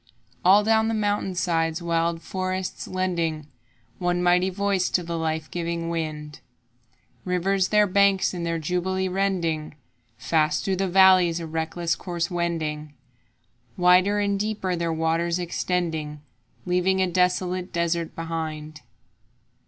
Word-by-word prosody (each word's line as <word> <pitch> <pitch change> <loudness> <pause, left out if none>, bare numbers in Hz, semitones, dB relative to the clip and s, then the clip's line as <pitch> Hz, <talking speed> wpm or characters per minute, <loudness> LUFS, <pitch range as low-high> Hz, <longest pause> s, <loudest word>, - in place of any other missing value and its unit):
All 195 +3 +6
down 220 +1 +3
the 225 - 0
mountain 205 -3 -1
sides 165 -3 0
wild 170 -1 -1
forests 185 +1 -4
lending 170 -5 -2 0.5
One 175 0 0
mighty 180 +1 +3
voice 195 -1 0
to 180 - 0
the 170 0 -4
life 160 -1 -3
giving 170 -1 -3
wind, 155 -2 -4 0.8
Rivers 185 +1 +1
their 210 0 +4
banks 200 0 +3
in 175 -2 -4
their 165 0 -1
jubilee 180 +3 -1
rending, 175 -6 -1 0.4
Fast 155 +2 0
through 190 -1 0
the 195 +1 0
valleys 185 -2 +5
a 165 - -5
reckless 165 +1 -2
course 175 -1 -3
wending, 155 -4 -3 0.8
Wider 180 +3 +4
and 200 -1 0
deeper 205 -3 -2
their 170 -1 -1
waters 165 +1 0
extending, 165 -4 -2 0.4
Leaving 180 +1 +1
a 190 - +3
desolate 180 0 0
desert 170 0 -1
behind. 155 -2 -5
175 Hz, 130 wpm, -24 LUFS, 165-185 Hz, 0.8 s, All